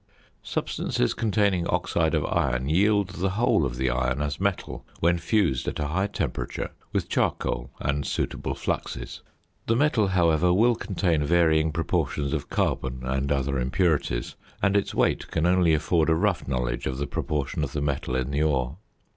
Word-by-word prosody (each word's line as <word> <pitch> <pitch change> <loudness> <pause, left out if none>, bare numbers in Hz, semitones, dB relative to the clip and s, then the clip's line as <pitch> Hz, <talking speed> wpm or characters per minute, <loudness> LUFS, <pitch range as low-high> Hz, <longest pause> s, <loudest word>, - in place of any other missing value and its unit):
Substances - - -1
containing 100 -5 +1
oxide - - +1
of - - 0
iron 65 0 0
yield 100 +4 +3
the 95 +1 -2
whole 95 - +2
of - - -6
the 65 0 +1
iron 65 +2 0
as 75 -1 -2
metal 100 -1 -2 0.2
when 85 +1 +2
fused 85 - +1
at - - -2
a 75 -2 -2
high 95 +5 0
temperature 100 - -3 0.2
with - - -1
charcoal 60 +1 -1
and 70 0 -1
suitable - - -2
fluxes. - - -4 0.5
The 115 - +3
metal, 125 -6 +3
however, 90 -2 +3
will 115 +7 +4
contain 90 -7 0
varying 80 0 +3
proportions 75 -4 -1
of - - -3
carbon 65 -1 -1
and 65 +1 -1
other 70 -1 0
impurities, 65 -2 0 0.2
and 100 0 +2
its 100 - 0
weight - - +1
can 80 0 0
only 90 -2 +4
afford 80 +1 +1
a 80 - +4
rough 95 +2 0
knowledge 60 -2 -2
of 65 - -3
the 70 - -1
proportion 75 +2 -2
of 70 -1 -4
the 75 - -1
metal 70 -3 -1
in 65 +1 -1
the 70 +1 0
ore. 70 -2 0
80 Hz, 170 wpm, -26 LUFS, 70-95 Hz, 0.5 s, will